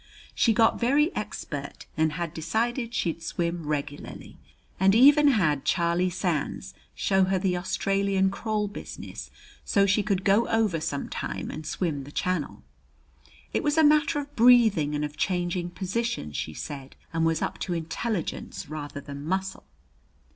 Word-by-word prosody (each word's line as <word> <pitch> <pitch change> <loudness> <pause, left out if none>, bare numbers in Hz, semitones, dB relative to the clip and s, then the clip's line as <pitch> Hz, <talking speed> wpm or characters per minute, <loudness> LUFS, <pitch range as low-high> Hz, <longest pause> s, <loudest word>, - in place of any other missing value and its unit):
She 230 - +3
got 225 0 +3
very 285 +7 +2
expert, - - -5
and 160 -1 +1
had 170 -1 -3
decided 230 - -1
she'd 170 -7 -2
swim 170 -1 -3
regularly, 145 -1 -5 0.4
and 195 +2 +5
even 290 +5 +7
had 160 - +2
Charlie 170 +1 +1
Sands 175 -4 -2 0.2
show 190 -1 +2
her 190 0 +1
the 185 -1 0
Australian 190 +1 +1
crawl 210 0 -1
business 205 - -8 0.3
so 200 -1 +3
she 195 +2 +3
could 200 -2 -1
go 205 +4 +3
over 220 -7 +1
some 140 -2 -3
time 135 - -4
and 155 0 -7
swim 155 -7 -2
the 140 - -11
Channel. 180 -2 -2 0.9
It - - +1
was 295 +1 0
a 320 - +6
matter 300 0 +4
of 290 0 -5
breathing 220 - +5
and 150 0 -1
of 150 0 -8
changing 175 -1 -1
positions, 185 - -3
she 80 - -4
said, 140 -3 -7 0.2
and 165 0 +1
was 165 -1 +1
up - - -3
to 180 - -2
intelligence 170 +4 -3
rather 145 -2 -6
than 140 0 -8
muscle. 190 +4 -3
185 Hz, 155 wpm, -26 LUFS, 160-220 Hz, 0.9 s, even